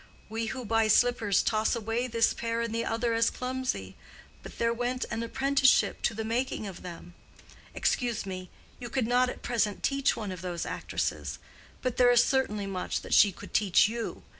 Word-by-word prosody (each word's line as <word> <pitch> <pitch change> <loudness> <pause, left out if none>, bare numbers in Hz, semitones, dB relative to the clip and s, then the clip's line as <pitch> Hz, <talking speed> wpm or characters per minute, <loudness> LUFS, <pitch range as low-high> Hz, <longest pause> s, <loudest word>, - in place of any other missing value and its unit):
We 225 +1 -3
who 255 +2 -5
buy 225 0 +2
slippers 220 -3 +3
toss 215 +1 +1
away 230 +2 -2
this 230 -1 +2
pair 230 0 -2
and 230 -1 -3
the 230 0 0
other 230 +1 0
as 230 0 +3
clumsy; 255 - -3 0.5
but - - -11
there 230 0 +1
went 245 +2 -2
an 225 - -2
apprenticeship 265 +3 +2
to 230 - 0
the 220 - -3
making 235 0 -1
of 195 -3 -8
them. 175 0 -9 0.6
Excuse 235 -4 0
me; 185 -1 -6 0.3
you 240 -2 -6
could 260 -2 0
not 250 +2 +3
at - - -8
present 220 -4 -1
teach 275 -1 +2
one 210 -3 -4
of 180 -2 -7
those 175 -2 -4
actresses; - - -3 0.5
but 255 -2 -1
there 245 -1 +6
is 240 -1 +6
certainly 215 -7 0
much 190 -2 -3
that - - -5
she 205 - +7
could - - -12
teach 200 -3 +4
you. 230 +1 -5
230 Hz, 190 wpm, -29 LUFS, 210-245 Hz, 0.6 s, she